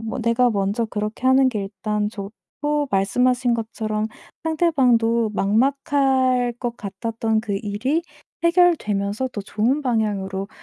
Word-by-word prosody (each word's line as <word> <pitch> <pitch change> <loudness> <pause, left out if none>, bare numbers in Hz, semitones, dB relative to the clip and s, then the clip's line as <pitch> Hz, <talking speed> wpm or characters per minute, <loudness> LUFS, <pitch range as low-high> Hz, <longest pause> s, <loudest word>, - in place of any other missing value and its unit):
뭐 225 +3 -5
내가 235 +2 +3
먼저 205 +2 0
그렇게 215 +3 -3
하는 260 0 +5
게 215 -5 -2
일단 210 +1 -2
좋고 275 +8 -4
말씀하신 245 +5 +2
것처럼 220 -1 -2 0.4
상대방도 250 -9 +2
막막할 260 +2 +2
것 240 -1 -3
같았던 225 +1 -2
그 215 -3 -4
일이 255 +11 -1 0.4
해결되면서 260 - +2
더 210 - -6
좋은 230 +8 0
방향으로 200 -5 -1
230 Hz, 270 characters per minute, -22 LUFS, 210-260 Hz, 0.4 s, 하는